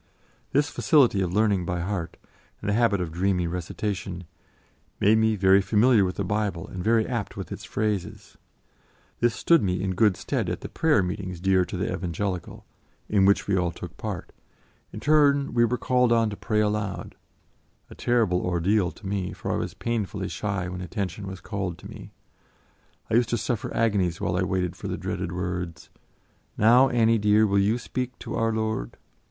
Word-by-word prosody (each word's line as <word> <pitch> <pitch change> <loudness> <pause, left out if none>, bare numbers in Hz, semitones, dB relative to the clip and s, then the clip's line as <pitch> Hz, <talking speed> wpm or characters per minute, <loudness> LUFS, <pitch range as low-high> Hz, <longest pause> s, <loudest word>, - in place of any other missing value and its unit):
This 145 +2 +2
facility 130 - +3
of 90 -2 -1
learning 100 -2 +2
by 90 -1 -2
heart, 90 -2 -4 0.4
and - - -7
the 105 - +2
habit 110 -4 +2
of 85 -3 -3
dreamy 90 +1 0
recitation, 90 +1 -4 0.8
made 110 +2 +4
me 110 0 +3
very 95 0 +5
familiar 105 +3 +4
with 90 -1 -1
the 100 - -2
Bible 100 -3 -2
and 90 -1 -6
very 115 +1 +3
apt 120 -5 -4
with - - -6
its - - -6
phrases. 105 -4 -3 0.8
This 120 -2 +2
stood 170 -2 +4
me 90 -2 0
in 95 -1 -1
good 100 0 +3
stead - - -2
at - - -4
the - - -7
prayer 150 -11 +2
meetings 90 -1 -4
dear 95 0 +3
to - - -6
the - - -1
Evangelical, 90 +1 -4 0.4
in 100 -2 +3
which 100 +1 +3
we 100 - +1
all 90 -2 +1
took 85 - -9
part; - - -5 0.6
in - - -7
turn 140 +1 +3
we 120 -1 +4
were 125 +2 0
called 125 -1 +2
on 115 -2 +3
to - - -5
pray 105 +1 0
aloud 105 -2 -2 0.8
a - - -8
terrible 110 -7 +1
ordeal 90 +2 +1
to 100 - -14
me, 95 -2 -2
for - - -4
I - - 0
was - - -4
painfully 105 -4 -3
shy 100 -4 -3
when 90 0 -6
attention 100 +1 -4
was 95 -2 -7
called 95 -5 -4
to - - -11
me; - - -11 1.0
I - - 0
used 120 0 +3
to 120 - +1
suffer 115 0 -2
agonies 100 -7 +1
while 85 - -1
I 90 - +1
waited 90 -1 -1
for - - -7
the - - -3
dreaded 90 -1 -4
words, 90 -1 -4 0.7
"Now, 125 +5 +6
Annie 115 -2 +3
dear, 105 +1 +4
will 100 -1 +2
you 105 +4 +2
speak 125 0 -4
to - - -7
our 115 0 +1
Lord." 110 - -2
100 Hz, 185 wpm, -25 LUFS, 90-110 Hz, 1.0 s, Now